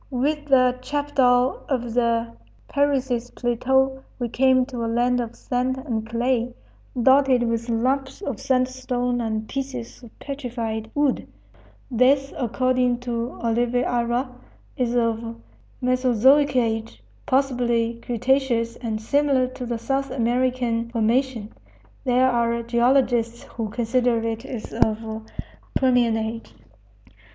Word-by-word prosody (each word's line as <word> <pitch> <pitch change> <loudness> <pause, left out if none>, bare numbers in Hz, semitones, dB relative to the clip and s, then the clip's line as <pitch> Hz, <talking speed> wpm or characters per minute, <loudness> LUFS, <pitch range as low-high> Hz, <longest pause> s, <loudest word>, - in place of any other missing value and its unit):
With 290 +3 -1
the 255 -2 +4
chapadao 260 -3 +2
of 245 -4 -1
the 230 -1 +1 0.3
Parecis 265 -4 0
plateau 265 +2 +1 0.2
we 240 -2 -3
came 260 +1 +3
to 250 -3 -5
a - - -1
land 245 +2 +2
of 235 0 -6
sand 255 +1 -1
and 230 -5 -4
clay, 240 +1 0 0.4
dotted 265 0 +4
with 230 0 -1
lumps 265 +4 0
of 275 - -4
sandstone 255 -1 0
and 220 -1 -2
pieces 260 -4 -5
of 235 -3 -15
petrified 235 -6 -4
wood; 290 -2 +1 0.6
this, 270 +3 +3
according 250 0 +1
to 240 0 -3
Oliveira, 240 +1 0 0.5
is 245 -1 -1
of 230 -1 0 0.5
Mesozoic 255 +3 +3
age, 225 - -1 0.2
possibly 240 -3 +1
cretaceous 245 -1 0
and 225 -3 -3
similar 275 +3 +2
to 255 -1 -7
the 235 -1 -2
South 270 +4 -1
African 245 -1 0
formation. 235 -1 0 0.5
There 255 +1 +4
are 235 -1 +1
geologists 235 -1 +2
who 225 -2 -5
consider 240 +2 +1
it 225 +2 -4
as 245 -5 -7
of 220 0 -1 0.5
Permian 245 -4 +3
age. 220 - -5
245 Hz, 115 wpm, -23 LUFS, 230-260 Hz, 0.6 s, the